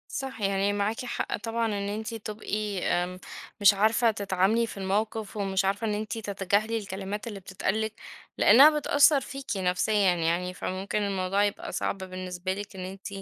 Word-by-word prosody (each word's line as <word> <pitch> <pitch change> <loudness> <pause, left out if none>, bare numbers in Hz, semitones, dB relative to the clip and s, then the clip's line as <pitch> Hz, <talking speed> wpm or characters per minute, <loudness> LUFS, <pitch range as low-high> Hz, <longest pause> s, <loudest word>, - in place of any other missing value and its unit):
صح، 265 -4 -5
يعني 195 0 +1
معاكِ 210 +4 -1
حق 245 - -2
طبعًا 230 0 -2
إن 200 -2 -2
أنتِ 220 +2 -4
تبقي 210 -2 -4
آمم، 180 +1 -1 0.4
مش 205 0 +8
عارفة 220 +3 +3
تتعاملي 200 +3 +1
في 220 - -9
الموقف 210 +2 -2
ومش 195 -1 0
عارفة 200 +3 0
إن 210 - 0
أنتِ 215 +2 -3
تتجاهلي 205 +1 0
الكلمات 200 +1 -5
اللي 205 -3 -6
بتتقال 195 +3 -2
لِك 220 0 -2 0.4
لأنها 290 +8 +7
بتأثر 285 -1 +5
فيكِ 275 0 -8
نفسيًا 190 +1 +2
يعني 170 +2 0
فممكن 190 +3 -3
الموضوع 195 0 0
يبقى 205 -1 -2
صعب - - -2
بالنسبة 185 -1 -4
لِك 205 +1 -7
إن 185 -1 -5
أنتِ 190 +1 -8
205 Hz, 165 wpm, -27 LUFS, 190-220 Hz, 0.4 s, مش